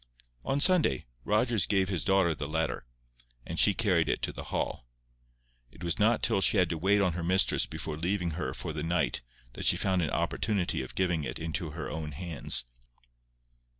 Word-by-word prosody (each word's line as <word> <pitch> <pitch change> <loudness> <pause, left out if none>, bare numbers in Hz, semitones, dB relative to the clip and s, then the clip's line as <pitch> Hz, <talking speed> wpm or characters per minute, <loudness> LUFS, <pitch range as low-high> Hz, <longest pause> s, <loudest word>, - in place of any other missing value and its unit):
On 140 - 0
Sunday, 165 - +4 0.2
Rogers 110 -1 +2
gave 95 -2 +1
his 95 -4 -1
daughter 95 -4 +3
the 70 -1 -5
letter, 80 -4 -2 0.6
and 85 - -4
she 100 - +6
carried 90 -8 +1
it - - -1
to - - -1
the - - -8
Hall. - - -3 0.8
It - - -13
was 85 +3 -2
not 110 +2 +3
till 110 -4 +2
she 100 - +4
had 90 -3 +3
to 85 - -2
wait 100 +4 +3
on 90 -4 +1
her 85 - -4
mistress 95 +3 +3
before 75 - -5
leaving 90 0 -1
her 80 +2 -4
for - - -5
the - - -4
night 85 +2 0 0.3
that - - -5
she - - +5
found 95 -2 +1
an 80 - -1
opportunity 100 -10 -1
of 65 - -9
giving 90 -4 0
it - - -4
into 80 +1 -3
her 75 -1 -6
own 75 +2 -5
hands. 80 -6 -1
90 Hz, 190 wpm, -29 LUFS, 80-100 Hz, 0.8 s, she